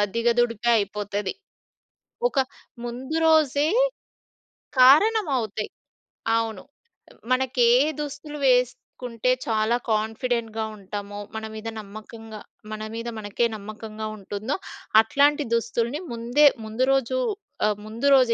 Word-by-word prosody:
దిగదుడిపే 235 Hz, 0 st, +2 dB
అయిపోతది. 205 Hz, -1 st, -2 dB, 1.0 s
ఒక -, -, -10 dB, 0.5 s
ముందు 255 Hz, +6 st, -4 dB
రోజే 305 Hz, -2 st, +4 dB, 1.1 s
కారణమవుతాయి. 270 Hz, -, +4 dB, 0.7 s
అవును. 225 Hz, -4 st, -3 dB, 0.7 s
మనకి 255 Hz, 0 st, +1 dB, 0.2 s
ఏ -, -, +5 dB, 0.2 s
దుస్తులు 295 Hz, +1 st, -6 dB
వేసుకుంటే, 250 Hz, -1 st, 0 dB, 0.2 s
చాలా 220 Hz, 0 st, +2 dB, 0.2 s
కాన్ఫిడెంట్‌గా 225 Hz, 0 st, -1 dB
ఉంటామో 205 Hz, +1 st, -7 dB, 0.2 s
మన 220 Hz, 0 st, -4 dB
మీద 220 Hz, +1 st, -7 dB
నమ్మకంగా 215 Hz, +1 st, -10 dB, 0.3 s
మన 215 Hz, 0 st, -5 dB
మీద 230 Hz, +1 st, -5 dB
మనకే 215 Hz, +2 st, -1 dB
నమ్మకంగా 215 Hz, +1 st, -7 dB
ఉంటుందో, 205 Hz, +6 st, -4 dB, 0.5 s
అట్లాంటి 285 Hz, +6 st, +3 dB
దుస్తుల్ని 235 Hz, +4 st, -1 dB
ముందే 240 Hz, +6 st, +4 dB, 0.2 s
ముందు 220 Hz, +4 st, 0 dB
రోజు 260 Hz, -1 st, +1 dB, 0.5 s
ఆహ్, 210 Hz, -1 st, +1 dB
ముందు 225 Hz, +5 st, -2 dB
రోజే 255 Hz, -3 st, +5 dB
230 Hz, 100 wpm, -24 LUFS, 215-260 Hz, 1.1 s, ఏ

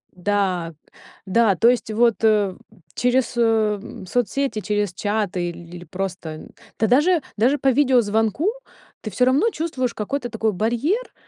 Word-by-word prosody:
Да, 185 Hz, -3 st, -1 dB, 0.5 s
да, 205 Hz, +1 st, +3 dB
то 230 Hz, +6 st, +4 dB
есть 245 Hz, -3 st, 0 dB
вот 230 Hz, -1 st, +3 dB, 0.8 s
через, 250 Hz, 0 st, +1 dB
э, 220 Hz, -2 st, 0 dB
соцсети, 245 Hz, +1 st, -1 dB
через 205 Hz, -3 st, -1 dB
чаты 200 Hz, -4 st, -2 dB
или 175 Hz, +1 st, -10 dB
просто 180 Hz, -5 st, -6 dB, 0.3 s
да, 220 Hz, -, +3 dB
даже 305 Hz, +6 st, +3 dB
даже 250 Hz, +7 st, +2 dB
по 270 Hz, -, +2 dB
видеозвонку, 245 Hz, -, +2 dB, 0.5 s
ты 215 Hz, -, -5 dB
всё 250 Hz, -, +1 dB
равно 280 Hz, -, +3 dB
чувствуешь 275 Hz, -7 st, -3 dB
какой-то 245 Hz, +4 st, -3 dB
такой 220 Hz, 0 st, -1 dB
барьер, 240 Hz, -, -1 dB
225 Hz, 130 wpm, -22 LUFS, 200-255 Hz, 0.8 s, то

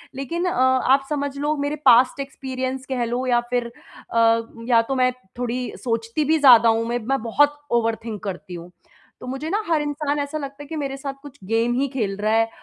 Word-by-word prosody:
लेकिन 335 Hz, +7 st, -3 dB
अ, 360 Hz, -, +1 dB
आप 260 Hz, +1 st, +3 dB
समझ 285 Hz, -2 st, -2 dB
लो 295 Hz, +2 st, 0 dB
मेरे 290 Hz, -, -1 dB
पास्ट 250 Hz, +2 st, +6 dB
एक्सपीरियंस 265 Hz, -1 st, -4 dB
कह 250 Hz, -2 st, -1 dB
लो 245 Hz, +2 st, -2 dB
या 240 Hz, -1 st, +3 dB
फिर 240 Hz, -1 st, -1 dB, 0.4 s
अ, 230 Hz, 0 st, +4 dB, 0.3 s
या 230 Hz, -2 st, +5 dB
तो 265 Hz, +4 st, -3 dB
मैं 255 Hz, 0 st, +3 dB, 0.3 s
थोड़ी 245 Hz, 0 st, -2 dB, 0.2 s
सोचती 230 Hz, +4 st, -1 dB
भी 315 Hz, +2 st, +3 dB
ज़्यादा 245 Hz, -5 st, +7 dB
हूँ, 225 Hz, 0 st, +1 dB
मैं 240 Hz, +1 st, -1 dB
मैं 265 Hz, +3 st, -1 dB
बहुत 290 Hz, +5 st, +2 dB
ओवरथिंक 225 Hz, -2 st, -1 dB
करती 185 Hz, -2 st, -6 dB
हूँ। 175 Hz, +1 st, -9 dB, 0.5 s
तो -, -, -8 dB
मुझे 270 Hz, +5 st, -4 dB
ना 415 Hz, +5 st, 0 dB
हर 320 Hz, -3 st, +2 dB
इंसान 290 Hz, 0 st, -2 dB
ऐसा 285 Hz, +2 st, -3 dB
लगता 280 Hz, -1 st, -7 dB
है 290 Hz, -, -13 dB
कि 325 Hz, -, -6 dB
मेरे 275 Hz, -3 st, -3 dB
साथ 275 Hz, 0 st, -5 dB
कुछ 285 Hz, -1 st, -12 dB
गेम 230 Hz, +3 st, +1 dB
ही 280 Hz, -, +1 dB
खेल 225 Hz, -7 st, -2 dB
रहा 215 Hz, +1 st, 0 dB
है 225 Hz, 0 st, +3 dB
260 Hz, 210 wpm, -22 LUFS, 230-285 Hz, 0.5 s, ज़्यादा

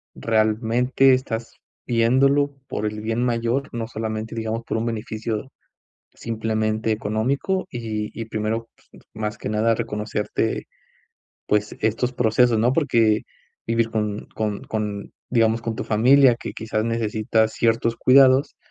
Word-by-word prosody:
realmente 115 Hz, +4 st, +2 dB
estás 115 Hz, -3 st, -4 dB, 0.3 s
viéndolo 135 Hz, +5 st, +3 dB
por 105 Hz, -, -3 dB
el 105 Hz, 0 st, -3 dB
bien 115 Hz, +2 st, -1 dB
mayor, 120 Hz, +3 st, 0 dB
no 115 Hz, -1 st, -3 dB
solamente, 110 Hz, -1 st, -4 dB
digamos, 115 Hz, 0 st, -3 dB
por -, -, -2 dB
un 115 Hz, -, -1 dB
beneficio 110 Hz, +1 st, -4 dB, 0.6 s
simplemente 110 Hz, -1 st, -1 dB
económico, 115 Hz, -, -1 dB
y 110 Hz, -3 st, -4 dB
y, -, -, -4 dB
primero, 110 Hz, +1 st, -3 dB, 0.2 s
pues, -, -, -17 dB
más 110 Hz, 0 st, -3 dB
que -, -, -5 dB
nada, 110 Hz, +2 st, +2 dB
reconocerte, 105 Hz, -1 st, -2 dB, 0.8 s
pues, 105 Hz, 0 st, 0 dB
estos 115 Hz, +3 st, 0 dB
procesos, 120 Hz, -1 st, +3 dB
¿no? 120 Hz, +4 st, +2 dB
Porque 115 Hz, -8 st, +2 dB, 0.4 s
vivir 115 Hz, 0 st, +1 dB
con 105 Hz, -2 st, -2 dB
con 105 Hz, -2 st, -2 dB
con 105 Hz, -2 st, -4 dB, 0.2 s
digamos, 115 Hz, -1 st, +2 dB
con 115 Hz, -1 st, -3 dB
tu -, -, -4 dB
familia, 125 Hz, +4 st, +5 dB
que 115 Hz, -, -7 dB
quizás 110 Hz, -1 st, -2 dB
necesita 110 Hz, -1 st, +1 dB
ciertos 115 Hz, +1 st, +1 dB
cuidados, 135 Hz, +1 st, +5 dB
115 Hz, 130 wpm, -23 LUFS, 110-120 Hz, 0.8 s, familia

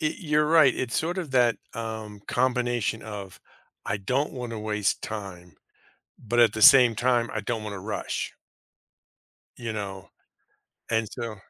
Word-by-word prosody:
eh, 155 Hz, -1 st, 0 dB
you're 150 Hz, -4 st, +1 dB
right. 155 Hz, -5 st, +5 dB
It's 125 Hz, -1 st, -2 dB
sort 175 Hz, +4 st, -2 dB
of 170 Hz, -6 st, -4 dB
that, 120 Hz, -3 st, +4 dB, 0.2 s
um, 110 Hz, -2 st, -6 dB
combination 120 Hz, -3 st, 0 dB
of, 100 Hz, -4 st, -8 dB, 0.5 s
"I 105 Hz, -, 0 dB
don't 130 Hz, +9 st, -1 dB
want 125 Hz, -3 st, -6 dB
to 115 Hz, -, -4 dB
waste 105 Hz, -2 st, -1 dB
time," 90 Hz, -6 st, -7 dB, 0.6 s
but 120 Hz, +1 st, -3 dB
at 115 Hz, -3 st, +5 dB
the 110 Hz, -, -3 dB
same 130 Hz, -5 st, +8 dB
time, 120 Hz, -1 st, +1 dB
"I -, -, -2 dB
don't 115 Hz, -3 st, -3 dB
want 105 Hz, -1 st, -5 dB
to 95 Hz, -, -6 dB
rush." 105 Hz, +1 st, -4 dB, 1.2 s
You 115 Hz, -2 st, -5 dB
know, 100 Hz, -3 st, -6 dB, 0.8 s
and 110 Hz, -1 st, +1 dB
so 115 Hz, -3 st, -5 dB
115 Hz, 155 wpm, -26 LUFS, 105-125 Hz, 1.2 s, same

